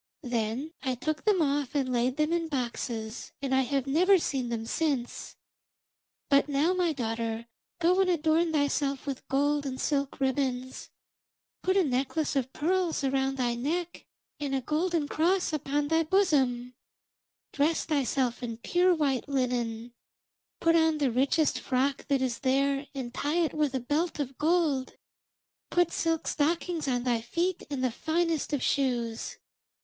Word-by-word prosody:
Then 240 +4 -2
I 260 -3 -1
took 310 - -3
them 400 -6 +4
off 285 -1 -1
and 260 -3 0
laid 250 +3 +1
them 305 +2 +1
in 335 -1 0
boxes, 235 -5 -4
and 275 -1 -2
I 265 - +4
have 270 0 -1
never 360 +8 +5
seen 265 -7 -2
them 225 -1 -3
since. 275 -2 -2 0.9
But 280 0 +3
now, 290 +6 +2
my 360 -2 +1
daughter, 230 -3 -3 0.3
go 355 +2 +3
and 375 - +2
adorn 325 0 +2
thyself 285 -2 0
with 275 -2 -5
gold 285 +2 +1
and 260 -2 -4
silk 280 -2 -1
ribbons; 260 -1 -1 0.7
put 375 +1 +1
a 385 - +5
necklace 275 +2 -1
of 260 -1 0
pearls 345 +1 0
around 270 0 0
thy 245 -2 +1
neck, 330 +8 -3 0.3
and 280 -2 -2
a 265 - 0
golden 315 +3 0
cross 350 +3 +1
upon 290 0 -1
thy 325 0 +3
bosom; 275 -9 +2 0.8
dress 300 +3 +1
thyself 265 -4 0
in 230 -2 -4
pure 355 +9 +2
white 285 -4 0
linen; 240 -3 -1 0.7
put 330 0 +3
on 320 -1 +3
the 280 -4 +1
richest 275 +5 +2
frock 270 +2 -1
that 275 -2 +2
is 245 -3 -1
there 275 +1 +1
and 245 -3 -5
tie 295 +5 -1
it 320 - -1
with 300 -3 0
a - - +1
belt 295 +7 -1
of 270 -2 -4
gold; 305 -5 +1 0.7
put 350 -1 +2
silk 330 -1 -1
stockings 325 +1 0
on 245 -2 0
thy 240 -2 +1
feet 340 +10 -1
and 275 -3 -3
the 255 - +2
finest 325 +4 -1
of 290 -3 -1
shoes. 240 -5 -1
280 Hz, 155 wpm, -28 LUFS, 255-320 Hz, 0.9 s, never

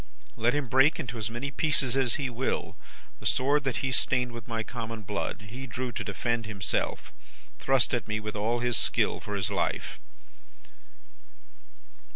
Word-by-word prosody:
Let 120 +4 +2
him 145 -3 0
break 130 +7 +5
into 120 -6 -4
as 110 - -2
many 120 +5 -3
pieces 135 -3 +2
as 130 -3 +2
he 140 - -1
will, 125 +1 -2 0.4
the - - -1
sword 140 +2 +3
that 135 0 0
he 130 - 0
stained 125 -1 +2
with 115 -2 -8
my 115 -1 -1
common 115 -2 -5
blood; 100 0 -3
he 130 +4 -6
drew 125 +1 -3
to - - -3
defend 115 +2 -1
himself 100 -3 -2 0.5
thrust 135 -2 +3
at 120 -4 0
me 110 0 -1
with 105 0 -5
all 115 +3 0
his 120 -2 +2
skill - - +2
for 105 - -5
his 95 0 0
life. 100 - -1
120 Hz, 170 wpm, -29 LUFS, 110-130 Hz, 0.5 s, break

